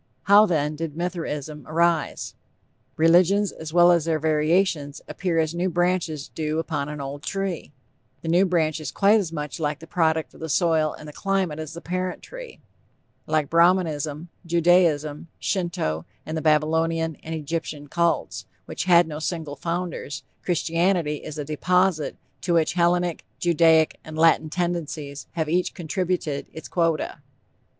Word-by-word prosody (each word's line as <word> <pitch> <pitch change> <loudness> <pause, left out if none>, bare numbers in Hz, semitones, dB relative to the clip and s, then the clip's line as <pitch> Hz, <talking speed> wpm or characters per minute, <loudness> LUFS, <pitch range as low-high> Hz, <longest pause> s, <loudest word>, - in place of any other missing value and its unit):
How, 205 +2 +7
then, 150 -3 0
did 160 -1 -5
Mithraism 155 -4 -4
arise? 165 -1 0 0.6
Religions, 180 +5 +4
as 160 -1 -8
well 175 +1 +6
as 170 -3 +3
their 165 -1 +1
variations, 155 -1 +1
appear 180 -3 -2
as 160 0 +1
new 175 +2 0
branches 175 -4 0
do 155 -1 -2
upon 155 -3 -2
an 150 0 -6
old 140 +1 -6
tree. 195 -4 -3 0.5
The - - -6
new 175 +4 +4
branch 160 -3 +1
is 155 -3 -5
quite 210 +2 +4
as 180 -6 -3
much 150 0 -5
the 150 +1 -3
product 160 -2 0
of - - -16
the 160 - -5
soil 160 -1 +2
and 150 -1 -10
climate 190 -5 -1
as 155 +1 -6
the 170 - -7
parent 185 +1 -3
tree. - - -10 0.7
Like 155 -2 0
Brahmanism, 165 -2 +2
Judaism, 170 -3 +2
Shinto 155 - -2 0.2
and 155 - -4
the 160 - -2
Babylonian 160 +1 +1
and 160 +1 -6
Egyptian 155 -1 -4
Cults, 170 +3 0 0.2
which - - -4
had 175 -2 +6
no 150 -1 -5
single 160 -3 -3
founders, 170 -3 -4 0.2
Christianity 170 -2 +1
is 155 +1 -8
a 150 - -3
deposit 180 +2 +1 0.3
to 175 -2 +1
which 160 -2 +2
Hellenic, 175 -1 +1
Judaic 165 -2 +3
and 155 0 -8
Latin 160 -1 +4
tendencies 155 -4 -3
have 160 -2 -1
each 175 +3 0
contributed 175 -4 -2
its 160 - -9
quota. 165 -3 -1
165 Hz, 150 wpm, -24 LUFS, 155-175 Hz, 0.7 s, How